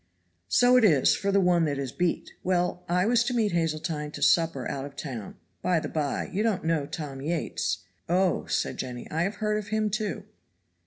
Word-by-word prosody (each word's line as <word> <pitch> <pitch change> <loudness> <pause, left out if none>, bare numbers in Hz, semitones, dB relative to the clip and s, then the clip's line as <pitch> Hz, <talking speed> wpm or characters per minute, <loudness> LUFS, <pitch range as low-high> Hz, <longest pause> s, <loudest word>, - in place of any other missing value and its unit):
"So 250 - +5
it 250 - +4
is 155 -11 +5
for 200 0 -1
the 200 - +4
one 175 -3 +3
that 145 -2 -1
is 135 -3 -3
beat. 175 +3 -1
Well, 180 -1 0
I 180 +1 +2
was 235 +1 +4
to 245 0 -1
meet 220 -3 +2
Hazeltine 155 -2 -1
to 145 - -4
supper 160 -4 +3
out 135 - -3
of 140 0 -8
town. 125 -9 -6 0.3
By 180 -2 +2
the - - -5
by, 150 -3 -1
you 200 - 0
don't 215 -7 0
know 160 -4 +1
Tom 145 -5 -6
Yates?" 105 - -2 0.3
"Oh," 185 +1 +2
said - - -1
Jenny, 125 -2 -5
"I 160 - 0
have 195 +4 0
heard 210 0 0
of 210 - -8
him, 215 0 0
too." 215 0 -2
170 Hz, 205 wpm, -27 LUFS, 145-200 Hz, 0.3 s, So